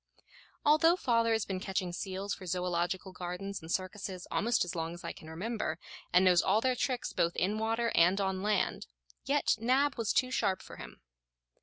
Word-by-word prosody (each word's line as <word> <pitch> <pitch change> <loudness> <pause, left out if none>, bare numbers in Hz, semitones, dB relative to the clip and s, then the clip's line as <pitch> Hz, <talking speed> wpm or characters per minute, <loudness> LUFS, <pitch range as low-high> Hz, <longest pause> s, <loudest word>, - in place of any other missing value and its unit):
Although 310 +3 +5
father 230 -8 +2
has 220 -1 +1
been 190 -1 -3
catching 185 -2 -2
seals 195 +2 -3
for 185 - -8
zoological 180 +1 -1
gardens 185 +2 -5
and 160 +1 -8
circuses 185 0 -3
almost 235 -2 +2
as 175 - -5
long 165 0 -3
as 175 - -12
I - - -4
can 160 - -12
remember, 180 0 -3 0.3
and 180 +1 +5
knows 180 -2 +6
all 200 +3 +3
their 255 +2 +1
tricks 250 0 -2
both 170 0 +1
in 205 +4 0
water 225 +1 0
and 180 +4 +4
on 190 -1 -1
land, 210 +1 0 0.4
yet 285 -3 +2
Nab 255 +3 +2
was 220 -2 +1
too 255 0 +2
sharp 190 -7 0
for - - -11
him. - - -10
195 Hz, 185 wpm, -31 LUFS, 180-230 Hz, 0.4 s, knows